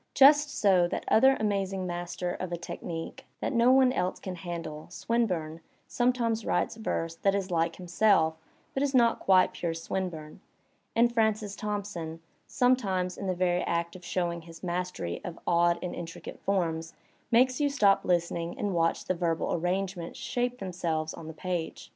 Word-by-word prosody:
Just 290 +2 +7
so 190 -9 +3
that - - -4
other 265 +4 +5
amazing 195 -3 -1
master 175 0 -3
of 185 -1 -5
a 175 - -2
technique 165 0 -6
that - - -2
no 235 +1 +5
one 260 -1 +5
else 180 -6 -1
can 185 - -5
handle, 165 -3 -6
Swinburne, 180 -7 -1 0.3
sometimes 240 -2 +1
writes - - 0
verse 165 -7 -3
that 195 +2 +2
is 195 -2 -2
like 165 0 +1
himself 180 -2 +3 0.4
but 270 - -1
is 280 -1 +1
not 235 -2 +4
quite 185 -1 +4
pure 165 -2 -3
Swinburne; 165 -1 -5 0.5
and 235 +1 +4
Francis 215 -3 +1
Thomp 210 -1 -3
son, 165 -5 -6 0.3
sometimes 200 -9 +1
in 195 - -5
the 185 - 0
veiy 180 0 +1
act 170 0 -1
of 185 - -11
showing 175 -2 -2
his 165 +1 -13
mastery 180 - -3
of 170 -2 -6
odd 170 0 +3
and 180 - -3
intricate 165 -1 -8
forms, 165 -4 -1 0.3
makes 255 +3 +3
you 290 - +3
stop 205 -8 +3
listening 170 -1 -1
and 205 -2 -1
watch 165 -1 +1
the - - +1
verbal 170 -2 -1
arrangements 180 0 -2
shape 245 0 -2
themselves 170 -6 -2
on 160 - -9
the - - -5
page. 175 +1 -4
180 Hz, 165 wpm, -29 LUFS, 170-215 Hz, 0.5 s, Just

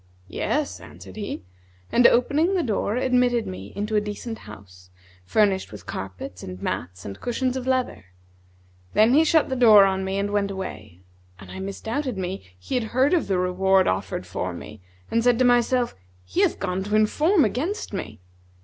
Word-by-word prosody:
'Yes,' 295 - -2
answered - - -12
he, 205 - -5 0.5
and 240 0 +6
opening 300 +10 +2
the 355 - +1
door 215 -2 -1
admitted 250 -2 +2
me 95 +2 -7
into 210 +1 -2
a 210 - +4
decent 210 +2 -6
house, 90 -3 -14 0.4
furnished 195 - +1
with 100 -4 -10
carpets 95 -1 -7
and 90 0 -8
mats 90 0 -4
and 100 0 -8
cushions 250 +1 -1
of 260 -1 -4
leather. 255 - -1 0.9
Then 220 +3 +5
he 305 +3 +6
shut 320 -1 +3
the 260 - -1
door 220 -5 +7
on 190 0 0
me 190 +1 -2
and 200 +1 -1
went 205 -1 0
away; 105 - -7 0.4
and 95 -2 -12
I - - -7
misdoubted 220 +6 -3
me 190 0 -4
he 90 - -8
had 250 -3 +1
heard 265 +6 +4
of 350 - +2
the 190 - +1
reward 185 +1 +2
offered 95 - -2
for - - -4
me, 110 - -10 0.3
and 230 0 +2
said 245 -1 +4
to 255 - +3
myself, 245 0 +2 0.3
'He 90 - -1
hath - - +2
gone 185 +1 -2
to 210 +1 -1
inform 300 - +3
against 295 - -3
me.' 110 - -5
210 Hz, 180 wpm, -24 LUFS, 180-250 Hz, 0.9 s, door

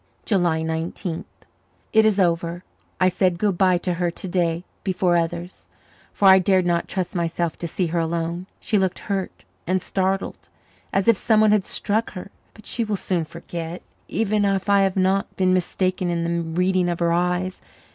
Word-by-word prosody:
July 175 -6 +1
Nineteenth. 160 +2 -3 0.7
It 220 0 +6
is 210 -2 +3
over. 170 -1 0 0.4
I 185 - +4
said 185 -1 +1
good 200 0 +1
bye 185 0 +3
to 180 +1 -2
her 175 0 0
to 175 - -7
day 170 -1 0 0.2
before 180 -2 +1
others, 170 +1 -3 0.4
for 200 - +2
I 190 0 +9
dared 185 0 +2
not 170 -1 +1
trust 185 -2 -3
myself 170 -1 -1
to 170 - -3
see 180 +3 -1
her 170 +1 -1
alone. 170 +2 -2
She 215 -2 +1
looked 190 -1 0
hurt 195 -2 -4 0.2
and 185 +1 +2
startled, 190 +1 -2 0.4
as 195 -1 0
if 230 -3 +5
someone 215 0 +4
had 210 -3 +3
struck 220 +3 -1
her. 190 +1 -8 0.2
But 215 - -16
she 235 - -1
will 215 -2 -1
soon 180 -3 -1
forget, 170 +1 -7 0.2
even 215 -1 0
if 195 0 0
I 200 0 +5
have 195 -1 +1
not 190 +1 +1
been 185 -1 +2
mistaken 185 0 0
in 170 -1 -1
the 170 0 0 0.2
reading 185 -1 +2
of 170 - -1
her 170 -1 +1
eyes. 180 +2 0
185 Hz, 180 wpm, -23 LUFS, 170-195 Hz, 0.7 s, I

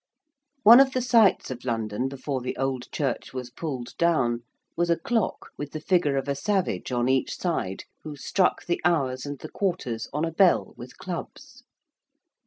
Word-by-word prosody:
One 230 +4 +10
of 270 -1 +5
the 255 - 0
sights 230 - +4
of 125 -1 -7
London 115 0 -2
before 135 0 -4
the 125 - -4
old 135 -2 -2
church 135 -3 -3
was 125 -1 -5
pulled 130 -4 -5
down 135 -9 +2 0.4
was 175 0 0
a 170 - +3
clock 225 +4 -2
with 145 -1 -5
the 155 - -3
figure 150 -4 +2
of 135 - -2
a 140 - +1
savage 185 +2 -1
on 120 0 +1
each 130 0 +1
side 160 - -2 0.2
who 155 -2 -7
struck 180 +6 0
the 175 - -1
hours 140 -6 +1
and 145 0 -5
the - - -8
quarters 170 - -2
on 150 +3 -1
a 165 - -3
bell 180 +2 +3
with - - -11
clubs. - - -7
145 Hz, 180 wpm, -26 LUFS, 130-175 Hz, 0.4 s, One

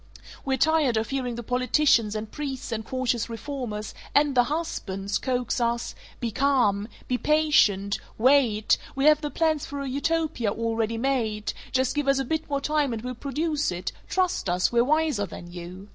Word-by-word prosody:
We're 265 -1 0
tired 305 -5 +3
of 220 +3 -2
hearing 255 -3 -2
the 240 - -6
politicians 250 -2 +2
and 215 0 -5
priests 275 -5 -5
and 220 -1 -2
cautious 245 -1 -1
reformers 230 -3 -5 0.2
(and 290 -1 +4
the 245 -2 +4
husbands!) 205 - -3
coax 250 -1 -1
us, 235 0 0 0.3
'Be 235 -2 -2
calm! 240 -6 +2 0.2
Be 250 -1 0
patient! 255 -11 +3 0.2
Wait! 235 -4 +4 0.2
We 270 +1 0
have 305 0 +6
the 295 - -2
plans 315 -2 0
for 285 - -5
a 275 - -4
Utopia 295 -3 0
already 225 0 -1
made; 225 -5 -1 0.2
just 260 -1 +1
give 295 -1 -1
us 275 0 +4
a 270 - -1
bit 315 +4 -2
more 280 -1 -1
time 295 -3 +1
and 225 -1 -5
we'll 250 0 -3
produce 295 - -1
it; 175 +1 -4 0.2
trust 365 - 0
us; 180 +1 +2
we're 235 0 +4
wiser 300 -7 +1
than 175 0 -10
you.' 180 +3 -9
255 Hz, 175 wpm, -26 LUFS, 220-290 Hz, 0.3 s, have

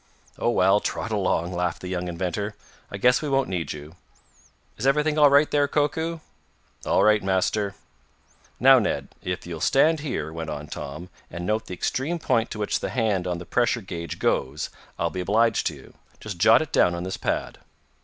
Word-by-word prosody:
"Oh, - - +1
well, 100 -3 +4
trot 110 - -3
along," 90 -4 0
laughed 90 -2 -1
the - - -4
young 90 -1 -3
inventor. 95 +4 -3 0.3
"I 100 - -6
guess 125 +5 +4
we 150 - -3
won't 135 0 +1
need 85 -5 -2
you. 75 +2 -9 0.8
Is 135 - -2
everything 150 +2 +2
all 145 -1 +7
right 145 +2 +4
there, 145 -1 +3
Koku?" 160 +3 -1 0.7
"All - - +3
right, 105 0 +4
Master." 95 +1 0 0.8
"Now, 135 0 +7
Ned, 105 - -2
if 90 0 -4
you'll 85 -2 -6
stand 155 - +3
here," 130 - -4
went 80 -1 -5
on 75 -1 -5
Tom, 75 +4 -7 0.2
"and 85 +1 -6
note 110 +3 -1
the 90 - -5
extreme 145 - -1
point 120 -8 +1
to - - -6
which 105 -1 -1
the - - -3
hand 105 -7 0
on 90 -1 -1
the 85 - -8
pressure 120 +2 +1
gauge 85 -4 -6
goes, 70 +4 -1 0.3
I'll 85 0 -1
be 90 - -3
obliged 110 +4 +2
to - - -3
you. - - -15 0.3
Just - - -7
jot - - +6
it - - -11
down 90 -1 +4
on 85 - -4
this 95 +1 -4
pad." - - -2
100 Hz, 195 wpm, -25 LUFS, 90-130 Hz, 0.8 s, all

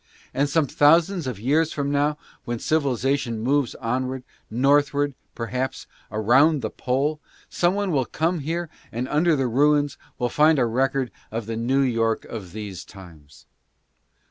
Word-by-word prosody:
And 140 +2 +1
some 155 +1 +2
thousands 165 +4 +3
of 120 -6 -4
years 150 +8 +2
from 140 -1 -2
now, 145 +1 +1 0.3
when 120 0 -3
civilization 135 -4 0
moves 135 +2 +1
onward 130 +2 -2 0.2
— - - -43 0.2
northward, 145 0 +3 0.2
perhaps, 125 +3 -3 0.3
around 130 +8 +3
the - - -2
Pole 140 +4 -1 0.2
— - - -29
some 175 +2 +4
body 200 -2 -1
will 135 -5 +1
come 165 +2 -1
there 170 +3 -2 0.2
and, 120 +3 -3
under 155 +3 +2
the 135 -2 0
ruins, 145 +4 +2 0.2
will 125 - 0
find 155 +3 +4
a 125 - +3
record 130 +2 0 0.2
of 115 0 -4
the 115 +1 -4
New 125 +5 +1
York 115 -4 +1
of 100 -6 -8
these 105 -2 -7
times. 75 -8 -15
135 Hz, 160 wpm, -24 LUFS, 115-150 Hz, 0.3 s, some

